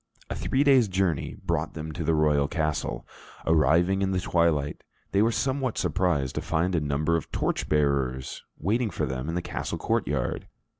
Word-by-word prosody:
A - - -1
three 135 +2 +1
days' 135 -5 +5
journey 95 -8 -1
brought 85 -3 -1
them 80 0 -5
to 85 +2 -4
the 80 +1 +2
royal 75 -2 +3
castle. 75 -2 -2 0.4
Arriving 85 +4 +3
in 95 - +1
the 95 -1 0
twilight, 80 -5 +1 0.3
they 100 - +3
were 115 +2 +3
somewhat 130 0 -1
surprised 85 -8 0
to - - -2
find 85 +3 0
a 85 - +3
number 75 +3 +1
of 80 - -7
torchbearers 70 -4 0
waiting 110 +7 0
for 80 -4 -2
them 65 +2 -4
in 85 - -2
the 90 - -2
castle - - -4
courtyard. - - -1
80 Hz, 170 wpm, -27 LUFS, 75-95 Hz, 0.4 s, days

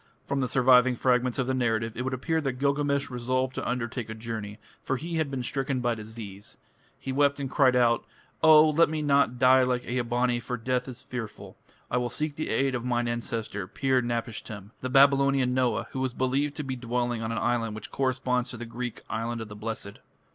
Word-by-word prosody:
From 140 - -1
the 130 - +1
surviving 125 0 +5
fragments 125 0 +1
of 135 - +1
the 130 - -1
narrative 115 -3 0
it 125 - -3
would 130 +1 -2
appear 160 +5 -1
that 135 -3 -1
Gilgamesh 140 +1 0
resolved 130 +1 -1
to - - -3
undertake 120 -1 -3
a 110 - -5
journey, 110 -2 -6 0.2
for 130 - -1
he 165 +4 -4
had 160 -3 0
been 135 -2 -3
stricken 135 +1 -1
by 120 -1 +1
disease. 110 -2 -9 0.4
He 135 - -5
wept 140 +1 +2
and 135 -2 -4
cried 130 -4 +4
out, 120 -1 +3 0.4
"Oh! 155 -1 +7
let 165 +2 +4
me 155 -1 -2
not 140 -4 +3
die 130 +1 +6
like 125 -1 0
Ea 125 +1 -1
bani, 120 +1 0
for 125 +1 -4
death 125 +2 -1
is 125 -2 -8
fearful. 115 -4 -7 0.4
I - - +2
will 125 -1 0
seek 150 +3 -3
the 155 - -3
aid 135 +4 +1
of 120 -2 -2
mine 120 -1 0
ancestor, 115 -4 -3
Pir 130 +4 +1
napishtim" 115 -3 -4
the 130 - -3
Babylonian 140 -1 +4
Noah, 125 -2 +1
who 130 - -4
was 130 -1 -2
believed 135 +3 0
to 150 - -3
be 130 -2 -3
dwelling 120 -1 -2
on 110 0 -3
an 115 - -2
island 115 -1 0
which 110 - -8
corresponds 130 -2 0
to 120 - -6
the 120 - -6
Greek 120 +1 -6
"Island 115 +1 -3
of 110 -1 -7
the 105 - -9
Blessed". 110 -1 -6
125 Hz, 210 wpm, -27 LUFS, 115-135 Hz, 0.4 s, Oh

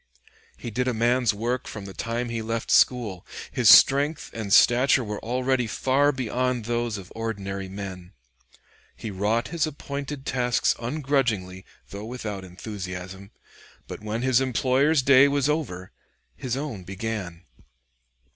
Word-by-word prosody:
He 120 - -7
did 125 +4 -1
a 125 - 0
man's 120 +1 +2
work 120 +4 -3
from 105 -3 -7
the 95 - -8
time 115 +3 -3
he 115 -1 -3
left 115 +1 -3
school; 110 -8 +3 0.3
his - - +3
strength 145 +3 +6
and 110 -3 -5
stature 125 +4 +5
were 105 -2 -6
already 125 +1 0
far 135 +6 +2
beyond 125 -2 -2
those 120 -1 -1
of 95 -2 -11
ordinary 100 -4 -4
men. 95 -2 -8 0.8
He 110 - -6
wrought 105 +5 0
his 165 -1 0
appointed 140 -1 -6
tasks 125 -2 +1
ungrudgingly, 120 -8 -1 0.3
though 100 +1 -7
without 110 -5 -5
enthusiasm; 95 0 -7 0.6
but - - -8
when 110 +3 -3
his 130 -1 +3
employer's 135 +3 +2
day 140 +1 +7
was 140 -1 +1
over, 140 - -3 0.4
his 130 -1 -3
own 135 -10 -5
began. 95 -2 -5
115 Hz, 135 wpm, -25 LUFS, 100-130 Hz, 0.8 s, day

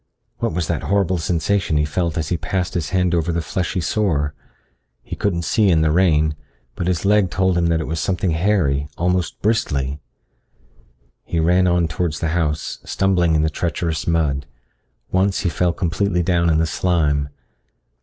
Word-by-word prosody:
What - - -1
was 85 0 -1
that - - -2
horrible 95 -3 +1
sensation 85 0 0
he 75 - +2
felt 85 +1 -2
as 80 0 -2
he 90 - +1
passed 90 +2 -2
his 80 -5 -2
hand 90 -1 +1
over 85 0 +1
the 85 - -1
fleshy 90 +3 -2
sore? 80 -6 0 0.7
He - - -6
couldn't 85 -4 -1
see 100 +7 +2
in 80 -3 +3
the 80 -1 +2
rain, 80 -3 +3 0.4
but 90 - -4
his 90 0 0
leg 105 -2 +3
told 95 0 +1
him 85 -1 +2
that 85 -1 +1
it 80 - -3
was 80 +1 -3
something 90 +1 0
hairy, 80 -5 +1
almost 90 0 -1
bristly. 70 -11 0 1.2
He 85 - -2
ran 90 +3 +3
on 85 -1 +2
towards 80 0 -2
the 80 - -1
house, 80 -2 -1
stumbling 90 -4 +1
in 75 - +2
the 80 - +2
treacherous 80 0 -2
mud. 75 -5 0 0.6
Once 95 +1 +1
he 90 - 0
fell 90 +1 +1
completely 90 +1 0
down 85 -1 +2
in 80 - +3
the 80 - +2
slime. 75 -4 0
85 Hz, 175 wpm, -20 LUFS, 80-90 Hz, 1.2 s, in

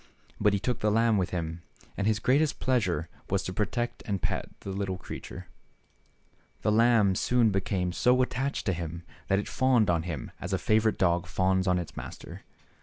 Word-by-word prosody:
But 105 - +3
he 100 - +1
took 120 +3 -2
the 105 - +1
lamb 115 0 +3
with 90 - 0
him, 85 -1 -4 0.3
and 100 - -1
his 110 -1 +3
greatest 140 +7 +2
pleasure 95 -11 0 0.2
was 95 0 0
to 90 - -4
protect 120 +5 -2
and 100 -3 -1
pet - - -2
the 100 - -5
little 95 -1 -2
creature. - - -8 1.2
The 105 - +2
lamb 110 -3 +4
soon 115 +3 +2
became 95 -2 -1
so 125 +6 +3
much 130 - +4
attached 135 +2 -2
to 95 - +1
him 85 0 -5 0.2
that 95 - +2
it 100 - -2
fawned 125 -7 +3
on 85 -1 +1
him 80 -6 -5
as 90 +2 -4
a - - +3
favorite 110 +2 +2
dog 90 -1 +2
fawns 95 +1 +1
on 90 0 +3
its 90 -2 -5
master. - - -8
100 Hz, 190 wpm, -28 LUFS, 90-115 Hz, 1.2 s, lamb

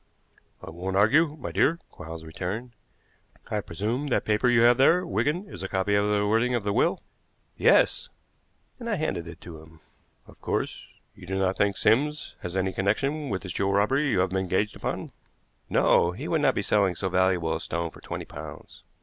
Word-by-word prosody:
"I - - -8
won't 90 +3 -4
argue, 145 +9 +4
my 85 - -5
dear," 120 - +2
Quarles 80 0 -9
returned. 95 +9 -5 0.8
"I 105 - 0
presume 110 - -3
that 130 - 0
paper 110 +4 +2
you 120 -1 +4
have 120 +1 +6
there, 170 +7 +4
Wigan, 170 +2 -1
is - - -9
a 95 - -3
copy 95 +2 0
of 100 0 +2
the 105 0 +2
wording 115 +4 +2
of 120 - -1
the 100 0 -1
will?" - - +1 0.5
"Yes," - - +3 0.7
and 235 -1 -5
I 210 - +1
handed 95 - -2
it 85 - -10
to 80 -3 -10
him. 80 0 -17 0.5
"Of - - -18
course, - - -3 0.3
you 90 -2 -14
do 95 +1 -2
not 95 0 +1
think 100 -1 +1
Sims 150 +6 +1
has 90 +1 -4
any 95 0 0
connection 135 +10 -1
with 95 -3 -3
this 90 -3 -5
jewel 100 0 0
robbery 135 +9 +2
you 100 -7 +2
have 95 - +1
been 95 +1 -1
engaged 95 +3 -1
upon?" - - -4 0.6
"No; 85 +1 +3
he 135 - -6
would 160 -2 +1
not - - +3
be 100 - -1
selling 100 -3 +2
so 95 - -2
valuable 95 -3 +1
a - - -4
stone 85 0 -3
for - - -15
twenty - - -6
pounds." - - -10
100 Hz, 200 wpm, -26 LUFS, 95-125 Hz, 0.8 s, have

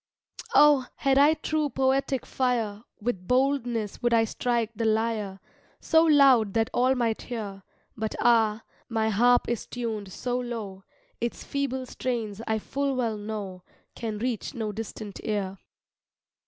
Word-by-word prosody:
Oh! 290 -4 +6
had 275 -1 +2
I 300 +3 +6
true 310 -1 -1
poetic 265 0 0
fire, 230 -5 -1 0.2
With 205 -5 -3
boldness 250 -5 0
would 240 -1 +3
I 225 - +5
strike 235 0 -1
the 230 - -2
lyre 220 -3 0 0.4
So 320 -1 +4
loud 270 -9 +5
that 225 0 +1
all 255 +2 +3
might 230 -3 0
hear; 210 -5 -6 0.3
But 220 -1 -3
ah! 225 -2 +3 0.3
my 220 -1 +1
harp 240 +4 +4
is 235 -2 -2
tuned 220 -5 -4
so 245 +5 -2
low, 220 -6 -6 0.3
Its 235 0 -3
feeble 265 -2 -2
strains 230 -5 -3
I 220 -1 +1
full 275 +5 -2
well 235 -4 0
know 205 -3 -6 0.3
Can 220 -2 -4
reach 235 0 -3
no 220 -3 -2
distant 215 -1 -7
ear. 195 -3 -2
230 Hz, 140 wpm, -27 LUFS, 215-255 Hz, 0.4 s, Oh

